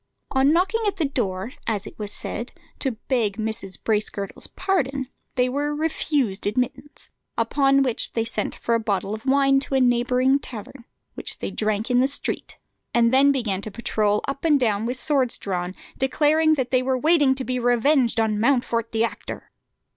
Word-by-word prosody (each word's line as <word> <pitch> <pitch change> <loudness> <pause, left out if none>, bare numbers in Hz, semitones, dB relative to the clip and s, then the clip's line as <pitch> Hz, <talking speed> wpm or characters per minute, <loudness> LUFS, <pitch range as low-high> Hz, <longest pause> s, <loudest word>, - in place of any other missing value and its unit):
On 270 +1 +4
knocking 375 +7 +2
at 405 - 0
the 325 - 0
door, 220 -5 -2
as 215 -2 -1
it - - -11
was 210 -1 -5
said, 235 +3 -5 0.3
to 265 -3 -1
beg 230 -6 0
Mrs. 220 -4 -2
Bracegirdle's 210 -2 -2
pardon, 275 -8 -1 0.3
they 250 -1 +2
were 290 +3 -1
refused 295 -9 -1
admittance; 260 +6 -3 0.3
upon 275 -1 +3
which 245 -4 0
they 225 - 0
sent 225 - -3
for 235 - -2
a 230 - +3
bottle 200 -2 -1
of 220 +4 -7
wine 275 0 +4
to 270 0 -2
a - - +4
neighbouring 250 +2 +3
tavern, 235 0 -9 0.3
which - - 0
they - - -4
drank 215 +2 -1
in 245 - +4
the 260 - +4
street, 280 - -3 0.4
and 235 0 +4
then 275 +2 +6
began 220 -8 -1
to 215 - -5
patrol 210 -1 0
up 275 0 -4
and 300 -4 +4
down 220 -3 +1
with 250 +1 -2
swords 270 -4 +2
drawn, 180 -1 -3 0.2
declaring 310 +4 +3
they 255 -2 +1
were 260 0 0
waiting 290 -2 +4
to 265 - -4
be 255 0 -2
revenged 245 0 +2
on 215 -2 +1
Mountfort 235 -2 +1
the 225 0 +2
actor. 230 - -5
250 Hz, 175 wpm, -23 LUFS, 220-275 Hz, 0.4 s, then